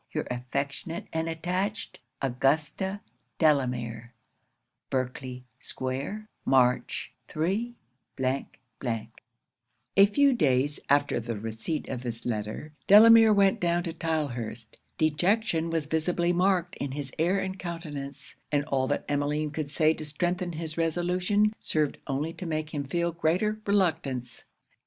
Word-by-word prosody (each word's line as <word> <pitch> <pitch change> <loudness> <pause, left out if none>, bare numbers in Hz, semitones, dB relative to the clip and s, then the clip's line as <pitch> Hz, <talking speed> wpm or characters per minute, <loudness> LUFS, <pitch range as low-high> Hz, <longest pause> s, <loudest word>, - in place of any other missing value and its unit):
your - - -1
affectionate 140 +6 -3
and 160 0 -1
attached, 180 +6 -3 0.2
AUGUSTA 155 +9 0 0.4
DELAMERE.' 125 -6 +1 0.7
Berkley 130 -1 -3 0.2
square, 140 +12 -4 0.2
March 125 -1 +2
3. 200 +10 -1 2.2
A 195 - +8
few 280 +7 +4
days 145 - +2
after 145 +1 +3
the 115 -1 -4
receipt 115 +8 -4
of 125 -2 -4
this 120 -2 -5
letter, 110 +6 -3
Delamere 225 +2 +9
went 200 +1 +4
down 175 -1 +1
to 170 -2 -4
Tylehurst. 120 -10 -3 0.2
Dejection 165 +3 +1
was 165 -2 -1
visibly 170 +3 +1
marked 180 -1 +2
in 140 -2 -3
his 140 -2 -5
air 175 +5 +3
and 190 -1 -3
countenance; 145 -5 -6
and 145 -1 +1
all 130 -3 0
that 145 - -1
Emmeline 145 +1 0
could 150 -1 -3
say 155 +1 +3
to 155 - -7
strengthen 175 +4 -2
his 160 0 -4
resolution, 180 +5 +1
served 155 -2 -1
only 145 +4 -1
to 180 - -7
make 155 -1 -3
him 145 -2 -1
feel 170 +5 -1
greater 180 +6 +1
reluctance. 160 - 0
155 Hz, 125 wpm, -28 LUFS, 135-180 Hz, 2.2 s, Delamere